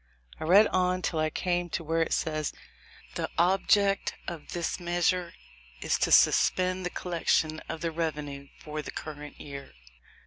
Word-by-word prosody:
I - - -4
read 195 +6 +7
on 185 0 +1
till 160 - -1
I 155 0 +2
came 175 +2 -1
to 170 - -3
where 165 +1 0
it 165 - 0
says, 155 -2 -1 0.6
"The - - -3
object 195 +3 +3
of 170 -4 -7
this 175 +1 -2
measure 175 0 0 0.4
is - - 0
to - - +1
suspend 185 0 +4
the 180 - -1
collection 165 -3 0
of 160 - -5
the 165 - -1
revenue 150 -4 -4 0.2
for 155 0 -4
the - - -8
current 150 -1 -8
year." 140 - -9
165 Hz, 160 wpm, -28 LUFS, 155-180 Hz, 0.6 s, read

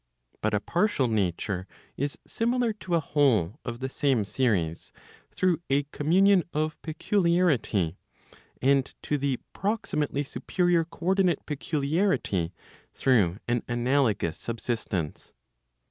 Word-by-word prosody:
But 110 0 +1
a - - +2
partial 170 - +1
nature 95 -3 -1 0.3
is 140 +1 -2
similar 235 0 0
to 185 -4 -2
a - - +4
whole 135 - +2
of 120 0 -5
the 130 - -1
same 135 -4 +1
series, 100 -8 -1 0.4
through 180 -3 +1
a 140 +1 +3
communion 185 +5 +4
of 155 0 -1
peculiarity, 160 - +1 0.6
and 135 0 +4 0.2
to 150 - -1
the 135 -2 0 0.2
proximately 150 -9 -1
superior 175 +3 +1
co 170 0 -11
ordinate 190 -2 +2
peculiarity 150 - 0 0.4
through 105 -9 +3
an 120 -1 +1
analogous 120 - +1
subsistence. 110 -8 -3
140 Hz, 115 wpm, -27 LUFS, 110-170 Hz, 0.6 s, a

